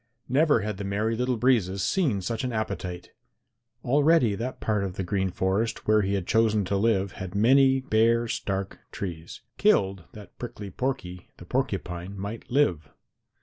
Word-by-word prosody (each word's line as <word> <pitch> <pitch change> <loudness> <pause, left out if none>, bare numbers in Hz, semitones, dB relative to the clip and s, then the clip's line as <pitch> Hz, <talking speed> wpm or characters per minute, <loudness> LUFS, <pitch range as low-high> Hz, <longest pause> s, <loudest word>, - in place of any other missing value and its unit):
Never 145 -2 +3
had 105 -1 -3
the 100 - -5
Merry 105 +3 -1
Little 125 +1 0
Breezes 105 -6 +2
seen 140 - +1
such 115 +5 -3
an 125 - -2
appetite! 95 -5 -4 0.7
Already 145 -2 +4
that 120 +5 -4
part 105 -2 0
of 95 -2 -4
the 95 - -3
Green 95 +1 -1
Forest 95 +5 -1
where 110 0 +5
he 100 0 0
had 95 -3 -2
chosen 110 -2 +2
to 100 - -1
live 100 -2 +1
had 95 +1 -7
many 130 +5 +4
bare 115 -1 +2
stark 95 -3 -3
trees, 85 -4 -6 0.2
killed 95 -3 +2
that 105 -2 -13
Prickly 110 -5 -7
Porky 90 -8 -4
the 90 - -12
Porcupine 95 -6 -3
might 100 +4 -6
live. 90 - +1
105 Hz, 160 wpm, -26 LUFS, 95-120 Hz, 0.7 s, where